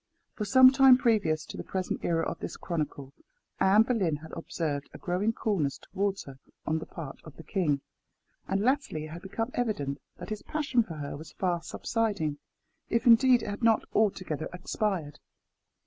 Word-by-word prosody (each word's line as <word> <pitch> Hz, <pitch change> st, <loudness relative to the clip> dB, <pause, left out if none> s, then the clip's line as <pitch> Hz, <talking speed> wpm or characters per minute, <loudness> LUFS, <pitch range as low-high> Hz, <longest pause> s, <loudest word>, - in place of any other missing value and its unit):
For 210 Hz, -, -3 dB
some 255 Hz, +5 st, +8 dB
time 265 Hz, -1 st, +7 dB
previous 200 Hz, -11 st, +1 dB
to -, -, -9 dB
the -, -, -5 dB
present 185 Hz, -1 st, -3 dB
era 165 Hz, -1 st, +1 dB
of -, -, -4 dB
this -, -, -6 dB
chronicle, 145 Hz, -5 st, -4 dB, 0.5 s
Anne 200 Hz, +3 st, +6 dB
Boleyn 205 Hz, -10 st, +1 dB
had 155 Hz, +2 st, -10 dB
observed 155 Hz, -4 st, -3 dB
a -, -, -8 dB
growing 185 Hz, +5 st, 0 dB
coolness 190 Hz, -11 st, -1 dB
towards 195 Hz, 0 st, -2 dB
her 135 Hz, -1 st, -12 dB, 0.3 s
on 160 Hz, +1 st, 0 dB
the 160 Hz, -, -8 dB
part 155 Hz, -6 st, -8 dB
of 155 Hz, -, -12 dB
the 160 Hz, -, -11 dB
king, 155 Hz, -9 st, 0 dB, 0.7 s
and 195 Hz, +1 st, 0 dB
latterly 250 Hz, -, 0 dB
it 155 Hz, -, -9 dB
had 170 Hz, +2 st, -8 dB
become 225 Hz, +6 st, -3 dB
evident 145 Hz, -, -1 dB, 0.2 s
that -, -, -8 dB
his 215 Hz, -, -3 dB
passion 285 Hz, -6 st, +1 dB
for 175 Hz, -8 st, -6 dB
her 145 Hz, -2 st, -5 dB
was 155 Hz, +3 st, -10 dB
fast 175 Hz, -3 st, -2 dB
subsiding, 200 Hz, -11 st, -1 dB, 0.5 s
if 230 Hz, +2 st, +1 dB
indeed 245 Hz, 0 st, +6 dB
it -, -, -5 dB
had 205 Hz, +2 st, -5 dB
not 225 Hz, -2 st, +3 dB
altogether 185 Hz, -7 st, 0 dB
expired. 180 Hz, -4 st, -2 dB
190 Hz, 180 wpm, -29 LUFS, 155-225 Hz, 0.7 s, some